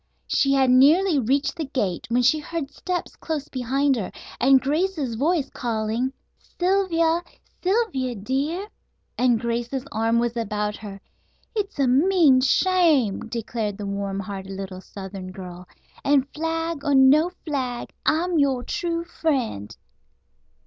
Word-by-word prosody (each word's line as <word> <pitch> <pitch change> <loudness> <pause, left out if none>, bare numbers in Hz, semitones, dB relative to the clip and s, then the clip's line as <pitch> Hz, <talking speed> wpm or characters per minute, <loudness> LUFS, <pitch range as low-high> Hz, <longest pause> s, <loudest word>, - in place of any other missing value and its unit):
She 275 -1 +2
had 265 -2 +4
nearly 300 +6 +5
reached 270 +4 +1
the 320 - -2
gate 210 -11 -2
when 245 +1 +2
she 305 +6 +4
heard 305 -2 -5
steps 360 -1 -4
close 305 -3 -4
behind 270 +2 +1
her 205 - -4 0.3
and 265 +1 +6
Grace's 300 -1 -1
voice 290 +4 0
calling: 230 +1 -2 0.3
"Sylvia, 350 -3 +1 0.4
Sylvia, 365 - 0
dear," 275 - -2 0.5
and 245 -3 +3
Grace's 240 +3 -2
arm 225 +1 +1
was 235 0 0
about 210 -2 -2
her. 200 -2 -9 0.6
"It's 415 -4 -2
a 275 -2 +2
mean 290 0 +5
shame," 285 - +2
declared 225 -3 -3
the 205 - -5
warm 200 0 -3
hearted 195 0 -7
little 190 -1 -6
southern 190 -1 -8
girl, 180 -1 -9 0.4
"and 275 -2 +3
flag 325 -1 -2
or 285 - +2
no 280 +6 +6 0.2
flag, 255 -6 -3
I'm 340 +1 +1
your 270 -3 +2
true 335 +4 -2
friend." 265 - -2
265 Hz, 135 wpm, -24 LUFS, 225-320 Hz, 0.6 s, and